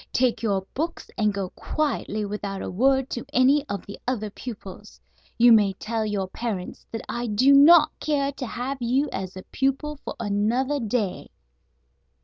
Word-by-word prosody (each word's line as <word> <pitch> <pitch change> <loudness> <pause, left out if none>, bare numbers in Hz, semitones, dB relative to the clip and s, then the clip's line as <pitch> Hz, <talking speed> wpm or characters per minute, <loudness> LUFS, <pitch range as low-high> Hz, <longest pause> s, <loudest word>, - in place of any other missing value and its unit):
Take 245 -3 +1
your 200 -4 +1
books 330 +4 -4
and 210 -1 +2
go 195 -2 -4
quietly 235 -8 -2
without 200 -1 -4
a - - -4
word 265 +6 +2
to 240 - -3
any 270 +3 +4
of 200 -2 -4
the 200 - -9
other 215 -5 -2
pupils. 200 - -9 0.4
You 240 +1 +7
may 205 -3 +5
tell 220 +3 -3
your 200 -2 -2
parents 195 -2 -5
that 225 - -5
I 240 0 -3
do 255 +6 +4
not 305 +2 +8
care 280 -2 0
to 265 -2 -6
have 260 +4 -4
you 260 +5 +1
as 190 0 -5
a 185 - -8
pupil 275 +3 -1
for - - -5
another 235 +7 0
day." 220 -5 -2
235 Hz, 165 wpm, -25 LUFS, 205-270 Hz, 0.4 s, not